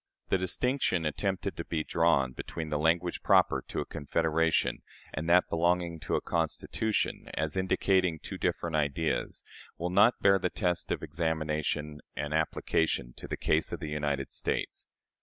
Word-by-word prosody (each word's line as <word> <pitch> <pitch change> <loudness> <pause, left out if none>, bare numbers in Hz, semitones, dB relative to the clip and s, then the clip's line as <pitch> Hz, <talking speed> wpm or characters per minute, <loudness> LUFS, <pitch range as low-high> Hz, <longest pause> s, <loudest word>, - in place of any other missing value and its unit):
The 95 - +2
distinction 95 - +1
attempted 95 +5 -1
to 85 - -3
be 80 -2 -1
drawn 80 -7 +2
between 80 +5 -6
the 75 - 0
language 85 +3 +1
proper - - +4
to - - -2
a - - -4
confederation 80 +2 0 0.3
and 80 +3 -3
that 90 +1 +5
belonging 85 0 +1
to - - -2
a - - +1
constitution, 85 +6 -1
as 80 +3 -1
indicating 95 -2 +2
two - - -8
different 85 -2 -1
ideas, 75 +1 -1 0.3
will 90 +1 -2
not 100 +6 +5
bear 100 -1 +5
the 90 - 0
test 90 -3 -1
of - - -1
examination 75 -1 -2
and 75 +3 -3
application 80 -4 0
to - - -8
the - - -3
case 80 - +1
of 85 - -4
the 75 -3 -5
United 75 -2 -2
States. - - -3
80 Hz, 160 wpm, -30 LUFS, 75-90 Hz, 0.3 s, that